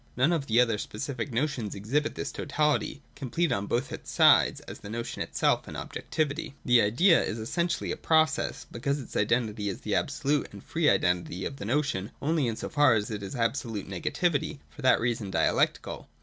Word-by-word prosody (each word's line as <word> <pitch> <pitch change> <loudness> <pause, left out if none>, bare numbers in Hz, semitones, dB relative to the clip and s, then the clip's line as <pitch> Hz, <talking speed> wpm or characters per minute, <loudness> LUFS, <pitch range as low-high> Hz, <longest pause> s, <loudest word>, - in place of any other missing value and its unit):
None 140 +7 +3
of 145 -5 -1
the 115 +2 +3
other 115 -4 +3
specific 130 +3 -4
notions 125 -4 -1
exhibits 135 +10 -1
this - - -4
totality 150 0 -1
complete 150 +6 -1
on 100 +1 -1
both 125 +3 -1
its - - -7
sides - - +5
as - - -10
the 100 - -10
notion 115 +2 -4
itself - - +1
and - - -7
objectivity. 155 -2 -3
215.] 120 - +4
The 115 - +8
Idea 160 - +4
is 110 - -3
essentially 160 +10 -1
a - - -3
process, 160 -1 +1
because 140 0 -1
its 130 - -9
identity 105 -1 0
is 95 - -6
the 105 - -3
absolute 145 +7 0
and - - -10
free - - +1
identity 90 +1 +1
of 135 - -5
the - - -6
notion, 120 -5 0
only 150 -2 +1
in 115 - -1
so - - -5
far 145 -5 +4
as 105 0 -1
it 105 -2 -4
is 100 +6 -6
absolute 115 -3 -2
negati\ 160 - 0
ity 145 - 0
and - - -14
for 145 - -12
that 130 - +5
reason 115 -4 -1
dialectical. - - 0
125 Hz, 200 wpm, -28 LUFS, 110-145 Hz, -, The